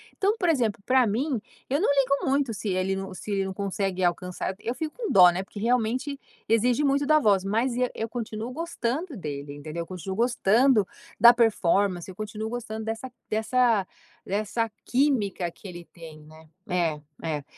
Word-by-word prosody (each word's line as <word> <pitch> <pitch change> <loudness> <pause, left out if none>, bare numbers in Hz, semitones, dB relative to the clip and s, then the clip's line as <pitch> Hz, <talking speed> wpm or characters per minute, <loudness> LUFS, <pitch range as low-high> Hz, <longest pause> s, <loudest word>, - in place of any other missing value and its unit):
Então, 410 +3 +1
por 360 - 0
exemplo, 235 -11 +1
para 255 -1 +4
mim, 240 +3 -1 0.3
eu 280 +6 +1
não - - +2
ligo 275 -1 +2
muito 275 -5 +1
se 205 +1 -4
ele 185 +1 0
não 195 0 -5
se 205 +3 -7
ele 195 -1 +1
não 190 - -4
consegue 195 -1 -2
alcançar, 180 +2 -2
eu 230 +3 -3
fico 310 +3 -4
com 465 -5 -3
dó, 180 -3 +8
né, 185 +2 -3
porque 205 - -10
realmente 250 +4 0 0.3
exige 235 +4 +3
muito 280 +1 +2
da 305 +1 +5
voz, 200 -8 +3
mas 230 +5 0
e 250 0 +1
eu 225 - -3
continuo 230 0 -5
gostando 310 -1 -3
dele, 145 -4 -6
entendeu? 155 +3 -6
Eu - - -5
continuo 190 +1 -5
gostando 235 -1 +3 0.3
da 235 +1 +9
performance. 200 -5 +2
Eu 185 - -9
continuo 215 +1 -5
gostando 220 -2 -5
dessa 225 +3 -4 0.2
dessa 220 -1 +2 0.4
dessa 215 +3 -1 0.2
química 235 -10 +1
que 200 - -22
ele 175 -2 -9
tem, 165 -3 -12
né? 155 +1 -16 0.2
É, 170 -4 0 0.2
é, 150 -3 -2
215 Hz, 180 wpm, -26 LUFS, 185-250 Hz, 0.4 s, da